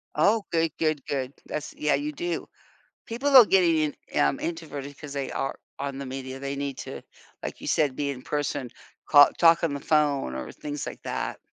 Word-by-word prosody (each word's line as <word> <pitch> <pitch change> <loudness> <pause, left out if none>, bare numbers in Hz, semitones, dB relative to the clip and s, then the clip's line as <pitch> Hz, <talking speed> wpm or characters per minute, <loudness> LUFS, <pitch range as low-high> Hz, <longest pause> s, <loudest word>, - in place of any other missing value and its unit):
Oh, 205 +8 +3
good, 165 -1 +2
good, 155 -3 0
good. 135 -1 -3
That's 150 -1 -5
yeah, 150 0 +1
you 300 +1 0
do. 345 +4 -3 0.6
People 270 +5 0
are 245 - +11
getting 180 -5 +4 0.3
in - - 0
um, 70 - +2
introverted 145 -4 -5
'cause 145 -2 -8
they 140 -2 -3
are 135 - -3 0.2
on 140 -1 -4
the 140 - -5
media, 130 0 -6
they 140 0 -3
need 140 -1 -3
to, - - -7 0.4
like - - -5
you - - -7
said, 145 -4 +2
be 145 +1 -1
in 130 -2 -5
person, 145 -4 -2 0.4
call 145 -2 +8
talk 165 0 +6
on 160 -4 +1
the 140 - -3
phone 145 - +1
or 65 - -5
things 145 -1 -5
like - - -7
that. - - -3
145 Hz, 200 wpm, -26 LUFS, 140-165 Hz, 0.6 s, are